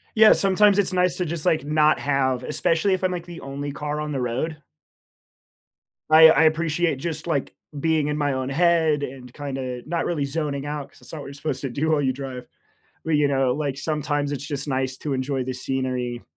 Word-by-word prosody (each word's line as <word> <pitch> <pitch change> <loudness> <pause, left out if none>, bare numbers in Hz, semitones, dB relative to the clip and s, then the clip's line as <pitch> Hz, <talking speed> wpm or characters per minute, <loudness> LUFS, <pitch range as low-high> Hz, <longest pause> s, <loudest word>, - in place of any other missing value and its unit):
Yeah, 220 0 +8
sometimes 200 +1 +4
it's 200 -1 +2
nice 180 -1 +2
to 180 - -1
just, 165 0 -4
like, 160 -5 +2
not 150 +1 +3
have 130 -3 0
especially 165 +7 +1
if 185 - -3
I'm, 185 -1 +1
like, 175 -2 -5
the 175 -1 -9
only 140 +1 -5
car 150 +1 -4
on 150 0 -4
the 135 - -2
road. 130 +6 -2 1.5
I 160 +1 +9
I 160 - +4
appreciate 160 0 +1
just, 165 +3 -4
like, 150 -5 -2 0.2
being 155 0 +1
in 150 - -1
my 145 -2 0
own 130 -1 -2
head 160 0 +2
and 125 -2 -7
kinda 130 -3 -5
not 165 +1 -1
really 155 -5 -1
zoning 140 -1 -3
out, 145 -1 -4
'cause - - -21
it's - - -9
not 160 - -6
what - - -8
you're 140 - -9
supposed 140 -2 -4
to 135 - -3
do 150 +6 -1
while 150 -2 +2
you 130 -1 +1
drive. 130 -2 -7 0.6
But, 160 -1 +1
you 145 -1 +3
know, 135 -2 +2
like, 140 -2 -2
sometimes 145 0 -2
it's 140 0 -5
just 145 -1 -4
nice 130 -2 -1
to 150 - -4
enjoy 130 0 -1
the 130 - -3
scenery. 125 -2 -3
145 Hz, 215 wpm, -23 LUFS, 135-160 Hz, 1.5 s, I